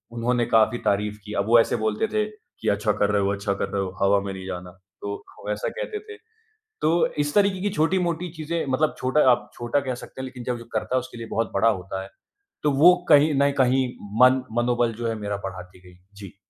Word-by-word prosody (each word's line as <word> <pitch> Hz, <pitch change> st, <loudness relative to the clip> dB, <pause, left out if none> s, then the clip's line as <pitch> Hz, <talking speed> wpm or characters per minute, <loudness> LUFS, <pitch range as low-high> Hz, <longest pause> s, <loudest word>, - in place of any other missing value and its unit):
उन्होंने 120 Hz, +1 st, +1 dB
काफ़ी 110 Hz, +1 st, +3 dB
तारीफ़ 105 Hz, +1 st, 0 dB
की 105 Hz, -, -7 dB
अब -, -, -3 dB
वो 115 Hz, 0 st, +6 dB
ऐसे -, -, +2 dB
बोलते 110 Hz, -, 0 dB
थे 215 Hz, 0 st, +2 dB
कि, 215 Hz, -1 st, -12 dB
"अच्छा 105 Hz, +1 st, +1 dB
कर 105 Hz, 0 st, +1 dB
रहे 100 Hz, -1 st, +2 dB
हो 100 Hz, -, +1 dB
अच्छा 100 Hz, 0 st, -2 dB
कर 100 Hz, -, -3 dB
रहे 100 Hz, -, -1 dB
हो।" 95 Hz, -, -4 dB
हवा 100 Hz, +1 st, +4 dB
में 100 Hz, -1 st, -5 dB
नहीं 95 Hz, 0 st, -8 dB
जाना। 90 Hz, -1 st, -6 dB, 0.3 s
तो 100 Hz, 0 st, -4 dB, 0.2 s
वो 105 Hz, -, -8 dB
ऐसा 105 Hz, -, -2 dB
कहते 475 Hz, -4 st, -5 dB
थे 425 Hz, -, -9 dB, 0.6 s
तो 165 Hz, +2 st, +3 dB, 0.2 s
इस 145 Hz, -, -3 dB
तरीक़े 200 Hz, -2 st, +3 dB
की 205 Hz, -, 0 dB
छोटी-मोटी 175 Hz, +1 st, +1 dB
चीज़ें 160 Hz, +2 st, -2 dB
मतलब 150 Hz, +4 st, +1 dB
छोटा 130 Hz, +4 st, +2 dB
आप 120 Hz, -, 0 dB
छोटा 120 Hz, +4 st, -1 dB
कह 130 Hz, -2 st, -3 dB
सकते 130 Hz, -, -9 dB
हैं -, -, -4 dB
लेक़िन 125 Hz, -1 st, -8 dB
जब 125 Hz, -1 st, -1 dB
जो 115 Hz, -, -11 dB
करता 130 Hz, -, -1 dB
है 130 Hz, -, +4 dB
उसके 125 Hz, -1 st, -10 dB
लिए 115 Hz, -, -6 dB
बहुत 115 Hz, 0 st, -1 dB
बड़ा 110 Hz, +4 st, +4 dB
होता 95 Hz, -2 st, -3 dB
है। 95 Hz, -, -11 dB, 0.5 s
तो 150 Hz, -, +3 dB
वो 165 Hz, +6 st, +7 dB
कहीं 150 Hz, 0 st, +6 dB
न 140 Hz, 0 st, +4 dB
कहीं 130 Hz, 0 st, +3 dB, 0.4 s
मन 130 Hz, 0 st, +5 dB, 0.2 s
मनोबल 120 Hz, -1 st, +1 dB
जो 120 Hz, +1 st, -3 dB
है 115 Hz, -, -1 dB
मेरा 105 Hz, -1 st, -3 dB
बढ़ाती 90 Hz, -1 st, -8 dB
गई। 90 Hz, -, -18 dB, 0.2 s
जी। 100 Hz, -1 st, -11 dB
120 Hz, 235 wpm, -24 LUFS, 100-145 Hz, 0.6 s, वो